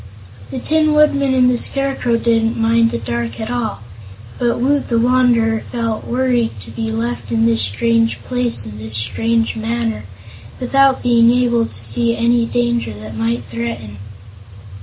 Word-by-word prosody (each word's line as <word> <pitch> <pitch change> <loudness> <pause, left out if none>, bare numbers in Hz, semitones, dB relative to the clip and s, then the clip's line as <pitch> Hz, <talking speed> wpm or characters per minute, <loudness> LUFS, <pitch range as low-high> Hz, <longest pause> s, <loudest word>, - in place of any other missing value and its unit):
The - - -6
Tin 310 +4 +1
Woodman 280 -3 +3
and 250 -1 +4
the 250 -1 +1
Scarecrow 270 -4 0
didn't 225 -1 +1
mind 230 0 +3
the - - -3
dark 115 +1 -4
at 220 +1 -4
all, 235 - -3 0.6
but 240 -1 0
Woot 280 +3 +1
the 235 - +1
Wanderer 235 -2 +2
felt 230 -2 -3
worried 245 - 0
to 110 - -9
be 110 -1 -4
left 120 0 -4
in 115 -1 +2
this 115 -1 +3
strange 225 - +1
place 245 - 0
in 105 -1 -9
this 110 0 -4
strange 225 - 0
manner, 225 - -3 0.5
without 270 +1 +2
being 235 -1 +4
able 240 -1 +2
to - - -7
see 235 -1 +1
any 235 0 +2
danger 240 - -1
that 110 +1 -9
might 115 +2 -1
threaten. 115 -2 -6
230 Hz, 160 wpm, -17 LUFS, -, 0.6 s, and